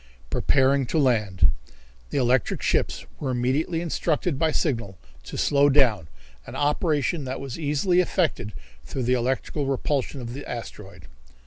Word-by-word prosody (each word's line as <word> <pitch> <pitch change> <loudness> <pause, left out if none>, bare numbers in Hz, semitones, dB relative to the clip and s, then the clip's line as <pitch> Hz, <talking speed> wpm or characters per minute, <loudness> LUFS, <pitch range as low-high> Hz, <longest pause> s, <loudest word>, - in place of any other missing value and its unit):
Preparing 135 -1 +3
to 160 - -1
Land. 105 - +3 0.6
The - - -2
electrical 125 -2 +1
ships - - 0
were 140 - -2
immediately 130 +7 0
instructed 165 -2 -1
by 160 -1 +2
signal 115 - -1 0.3
to - - -7
slow 140 0 +4
down, 120 - +3 0.4
an - - -8
operation 150 +1 +1
that 130 +1 -4
was 135 +1 -6
easily 160 +4 +2
affected 165 - 0 0.3
through 125 - -4
the 125 +2 +2
electrical 130 +3 -1
repulsion 135 0 -1
of 120 -1 -6
the 140 +2 -6
asteroid. 95 -7 -8
135 Hz, 140 wpm, -25 LUFS, 120-150 Hz, 0.6 s, slow